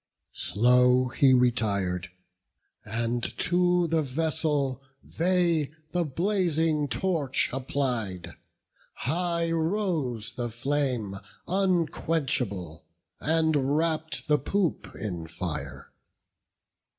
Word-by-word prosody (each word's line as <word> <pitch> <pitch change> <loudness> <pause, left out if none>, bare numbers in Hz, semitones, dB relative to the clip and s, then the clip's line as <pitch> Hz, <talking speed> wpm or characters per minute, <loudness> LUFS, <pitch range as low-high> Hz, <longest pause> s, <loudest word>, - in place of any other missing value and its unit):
Slow 125 +3 +4
he 135 +2 +4
retir'd; 100 -8 +1 0.7
and 115 +2 -2 0.2
to 180 0 +2
the 165 -1 +1
vessel 150 -2 0 0.2
they 170 -4 +1 0.2
The 175 -1 +1
blazing 165 -2 +1
torch 160 -7 0
applied; 125 -8 -2 0.6
high 170 +3 0
rose 160 - -1
the 120 0 -3
flame 120 -4 -1 0.3
Unquenchable, 155 - 0 0.4
and 155 -3 +2
wrapp'd 160 0 -1
the 150 -1 +3
poop 185 +4 -1
in 85 -6 -5
fire. 80 -1 -5
145 Hz, 80 wpm, -27 LUFS, 120-165 Hz, 0.7 s, Slow